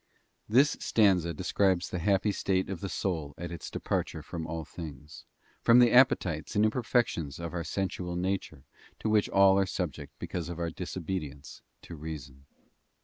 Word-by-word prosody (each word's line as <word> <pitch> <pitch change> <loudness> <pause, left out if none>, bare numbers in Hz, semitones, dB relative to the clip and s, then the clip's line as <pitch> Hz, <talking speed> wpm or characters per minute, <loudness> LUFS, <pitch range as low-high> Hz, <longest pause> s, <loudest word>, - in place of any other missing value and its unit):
HIS 135 +6 +5
stanza 95 -6 +3
describes 95 0 +1
the 90 - -2
happy 100 +3 +2
state 95 -1 0
of 95 - -4
the 100 - -4
soul 80 -9 -2
at 85 0 -6
its 85 - -6
departure - - -2
from 80 -2 -5
all 80 -1 -4
things, 75 -2 -9 0.4
from 115 - +6
the 120 -2 +6
appetites 90 - +3
and 105 +1 +4
im 110 - +3
perfections 110 - 0
of 85 0 -5
our 85 -1 -2
sensual 90 -2 -3
nature 90 -6 -2 0.3
to 110 - -2
which 105 -1 +3
all 100 0 +5
are 95 - +2
subject - - -4
because 85 -1 -4
of 85 - -5
our 85 -1 -2
disobedience 80 -5 -5 0.2
to 85 - -9
reason. 70 -3 -8
90 Hz, 165 wpm, -29 LUFS, 80-100 Hz, 0.4 s, from